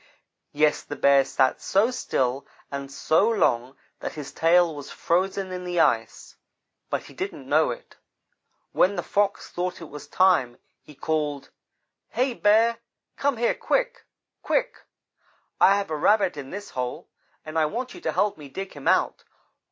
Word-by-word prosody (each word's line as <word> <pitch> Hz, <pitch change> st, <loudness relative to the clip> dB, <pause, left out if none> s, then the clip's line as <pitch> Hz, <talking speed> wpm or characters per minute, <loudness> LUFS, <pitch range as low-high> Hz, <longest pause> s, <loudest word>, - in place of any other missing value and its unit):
Yes, 150 Hz, 0 st, +2 dB
the -, -, -7 dB
Bear 140 Hz, -1 st, +5 dB
sat 130 Hz, -1 st, +1 dB
so 210 Hz, +6 st, +2 dB
still 130 Hz, -, -1 dB, 0.2 s
and 140 Hz, 0 st, -5 dB
so 160 Hz, +9 st, +2 dB
long 130 Hz, -, +1 dB, 0.2 s
that -, -, -5 dB
his 145 Hz, -3 st, -7 dB
tail 165 Hz, +2 st, +3 dB
was 145 Hz, -1 st, -8 dB
frozen 190 Hz, +2 st, -1 dB
in 180 Hz, 0 st, -5 dB
the 175 Hz, -1 st, -2 dB
ice, 115 Hz, -7 st, 0 dB, 0.5 s
but -, -, -2 dB
he -, -, -14 dB
didn't 165 Hz, -4 st, -6 dB
know 155 Hz, +3 st, +3 dB
it. 120 Hz, -, -8 dB, 0.7 s
When 195 Hz, +2 st, +3 dB
the 175 Hz, -, -2 dB
Fox 205 Hz, 0 st, 0 dB
thought 180 Hz, +1 st, -3 dB
it 165 Hz, -, -10 dB
was 150 Hz, -1 st, -9 dB
time, 180 Hz, -10 st, +3 dB, 0.2 s
he 150 Hz, -, -16 dB
called: 150 Hz, -2 st, -2 dB, 0.6 s
"'Hey, 255 Hz, 0 st, 0 dB
Bear, 225 Hz, +2 st, +3 dB, 0.4 s
come 280 Hz, -3 st, 0 dB
here 235 Hz, +1 st, +2 dB
quick -, -, -1 dB, 0.3 s
quick! -, -, 0 dB, 0.8 s
I 195 Hz, -, +6 dB
have 200 Hz, -5 st, -3 dB
a -, -, 0 dB
Rabbit 185 Hz, +3 st, +3 dB
in 140 Hz, -2 st, -7 dB
this 205 Hz, +1 st, -7 dB
hole, 125 Hz, -1 st, -4 dB, 0.4 s
and 155 Hz, 0 st, -8 dB
I 155 Hz, -, +3 dB
want 245 Hz, +9 st, -4 dB
you 360 Hz, -, -11 dB
to -, -, -1 dB
help 205 Hz, -6 st, 0 dB
me 145 Hz, -2 st, -10 dB
dig 195 Hz, +7 st, -6 dB
him 145 Hz, -2 st, -8 dB
out.' -, -, +2 dB
170 Hz, 165 wpm, -25 LUFS, 140-205 Hz, 0.8 s, I